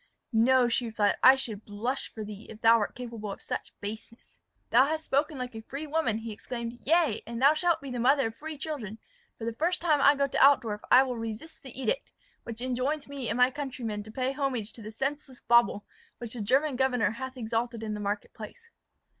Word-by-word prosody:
"No," 245 +2 +5
she 240 0 0
replied, 215 -2 +1
"I 260 +1 +9
should 225 -6 -5
blush 235 +6 -3
for 220 - -6
thee, 210 +1 -9
if 220 0 -11
thou 230 0 +6
wert 210 - -2
capable 230 -4 -6
of - - -7
such - - -6
baseness." 220 +3 -8 0.3
"Thou 255 +4 +6
hast 315 +1 -2
spoken 290 +2 0
like 250 -1 -5
a 225 - -7
free 275 +7 -6
woman," 300 -8 0
he 225 0 -6
exclaimed. 235 +2 -6
"Yea, 320 -7 +2
and 235 0 -5
thou 280 +4 +6
shalt 330 0 +1
be 275 -2 -7
the 245 - -3
mother 270 +3 +4
of 225 - -14
free 310 0 -7
children: 265 -9 -5 0.4
for 225 - -6
the 230 - -2
first 330 +9 0
time 310 -4 +2
I 285 +1 +6
go 280 0 +2
to 275 - +2
Altdorf 230 -7 +4
I 255 - +8
will 250 -2 -3
resist 225 +8 -7
the 265 -1 -9
edict, 485 - -2 0.3
which 230 0 -7
enjoins 260 +4 -1
me 275 -4 -4
and 230 - -1
my 250 +1 +5
countrymen 250 -7 -4
to 215 +1 -11
pay 255 +3 -1
homage 260 -6 -2
to 230 - -10
the 215 - -7
senseless 270 +3 -4
bauble 235 -3 +3 0.3
which 235 -2 -7
the 240 - -5
German 270 +6 +2
governor 250 -4 +2
hath 260 +3 -7
exalted 230 0 -2
in 215 -1 -3
the 210 - -4
market 205 0 -3
place." 460 - -11
245 Hz, 220 wpm, -28 LUFS, 225-275 Hz, 0.4 s, I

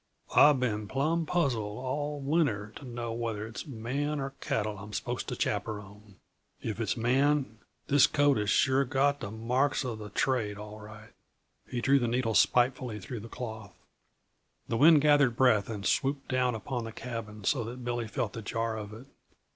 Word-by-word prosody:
"I've 145 -2 +7
been 110 -4 -1
plumb 155 +7 0
puzzled, 120 -12 0
all 145 +3 -3
winter, 135 -9 0
to 140 - -11
know 120 -2 -4
whether 115 -2 -3
it's 115 +5 -7
man 140 +4 -2
or 135 0 -3
cattle 105 -2 -2
I'm 105 +1 -10
supposed - - -3
to - - -3
chappyrone. 105 -1 -4 0.4
If 110 0 -4
it's 115 +1 -1
man, 130 0 +1 0.3
this 140 -1 +5
coat 145 -2 +3
has 105 -1 0
sure 135 +3 +3
got 140 +2 +1
the - - -5
marks 125 +6 0
uh 125 - -2
the 105 -1 -8
trade, 105 -2 0
all 105 +1 -9
right." 105 0 -12 0.6
He 120 - -3
drew 140 +3 +4
the 120 - 0
needle 115 -1 0
spitefully 120 +2 +2
through 115 +5 -6
the 115 +2 -10
cloth. 110 -6 -7 0.9
The 115 - -1
wind 155 +2 +7
gathered 145 -5 +4
breath 115 -6 +3
and 105 -3 -5
swooped 135 +1 0
down 125 -2 +1
upon 120 +2 -4
the 115 - -6
cabin 110 -3 -7
so 120 +5 +1
that 120 +2 -7
Billy 120 -1 -2
felt 115 -1 -3
the 115 - -6
jar 115 +2 -2
of 105 -1 -6
it. 115 +4 -10
120 Hz, 180 wpm, -29 LUFS, 110-135 Hz, 0.9 s, I've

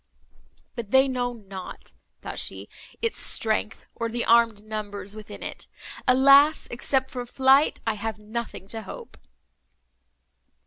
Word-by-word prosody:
"But 235 -4 -6
they 265 +3 +5
know 250 -2 -1
not," 195 -5 -10 0.3
thought - - -5
she, - - -2 0.4
"its 460 - -1
strength, 220 0 0
or 230 - -3
the 235 +1 -2
armed 230 -3 +4
numbers 210 -2 -5
within 215 -1 -9
it. - - -7 0.4
Alas! 275 +4 +6
except 265 +2 -1
from 245 -1 -5
flight, 265 +4 +3
I 225 - +1
have 215 +1 -4
nothing 215 -2 -6
to 225 0 -5
hope!" 195 - -10
230 Hz, 130 wpm, -25 LUFS, 215-260 Hz, 0.4 s, Alas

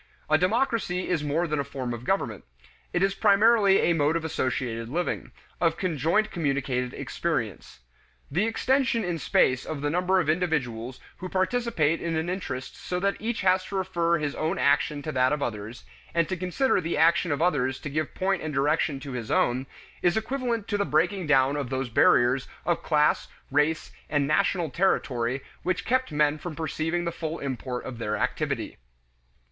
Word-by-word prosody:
A 155 - +7
democracy 210 -2 0
is 170 -4 0
more 150 +4 0
than 150 -3 -1
a - - +1
form 130 -3 -4
of 120 +1 -7
government; 120 - -1 0.5
it 175 - +1
is 195 0 +2
primarily 200 0 +5
a 170 - +3
mode 150 0 +2
of 165 -1 -1
associated 120 -6 -2
living, 175 +6 -2 0.3
of 165 -2 +2
conjoint 180 - +1
communicated 135 -6 -1
experience. - - -3 0.5
The 195 +6 +1
extension 255 0 +1
in 175 -3 -2
space 130 -2 +2
of 155 -3 -5
the 145 0 0
number 180 +3 +2
of 170 - 0
individuals 130 -8 -1 0.2
who 185 - -6
participate 185 -5 +1
in 170 -1 -2
an 160 +2 -1
interest 170 -8 -5
so 180 - -3
that 200 +2 +1
each 230 +1 -2
has 185 0 +3
to 200 - -6
refer 175 -3 +1
his 150 -2 -2
own 160 +5 -1
action 145 0 +2
to 155 - -3
that 130 -1 +2
of 150 -1 0
others, 110 +1 -5 0.3
and 170 -2 +3
to 185 - -1
consider 185 +8 +1
the 165 -1 -2
action 165 +1 +4
of 145 - 0
others 135 -6 +1
to - - -5
give 155 +1 -2
point 190 0 0
and 155 -2 -4
direction 145 +1 +1
to 140 -1 -7
his 120 -4 -5
own, 130 +2 +1 0.3
is 175 +3 +2
equivalent 235 -2 -2
to 205 - 0
the - - +3
breaking 175 +2 +1
down 135 -1 +4
of 140 -4 -3
those 130 -1 -2
barriers 125 +3 +4 0.2
of 175 - +1
class, 150 -2 +2 0.2
race, 150 +3 +1 0.2
and 145 -2 +1
national 170 +1 +1
territory 130 -8 0 0.2
which 185 +2 -1
kept 255 +2 +1
men 150 0 +2
from 170 -1 -6
perceiving 160 +2 -2
the 170 - -1
full 160 0 -4
import 130 -2 -4
of 120 -3 -7
their 105 -1 -1
activity. - - -2
160 Hz, 180 wpm, -26 LUFS, 140-185 Hz, 0.5 s, A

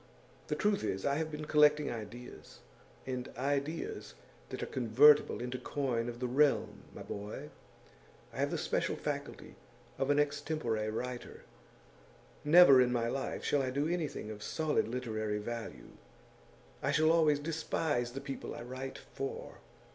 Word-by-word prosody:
The - - -1
truth 210 -1 +1
is, 95 - -2
I 140 0 +2
have 160 0 -1
been 150 0 -6
collecting 150 -1 +4
ideas, 115 +2 -9 0.4
and 125 -1 -4
ideas 140 - -2 0.3
that - - -5
are - - -1
convertible 130 +5 +5
into 125 +1 -4
coin 120 -5 -1
of 120 0 -7
the 125 - -2
realm, 140 +3 +2
my - - -9
boy; 105 +1 -7 0.8
I - - -10
have - - +1
the - - -2
special - - -1
faculty - - -5 0.4
of 135 - 0
an 145 - +4
extempore 145 -7 0
writer. 125 +3 -5 1.0
Never 150 -4 +8
in 125 -1 +3
my 115 -1 0
life 135 +2 -3
shall 145 - +2
I 130 - -1
do 140 +4 0
anything 160 -10 -3
of 105 -1 -8
solid 155 +2 0
literary 110 -3 -2
value; 115 +2 -6 0.9
I 140 - +1
shall 155 +2 +4
always 155 -3 +4
despise 145 -5 -1
the 135 - -5
people 140 -1 -6
I - - -7
write 130 +2 -6
for. 135 - -7
135 Hz, 150 wpm, -33 LUFS, 120-150 Hz, 1.0 s, Never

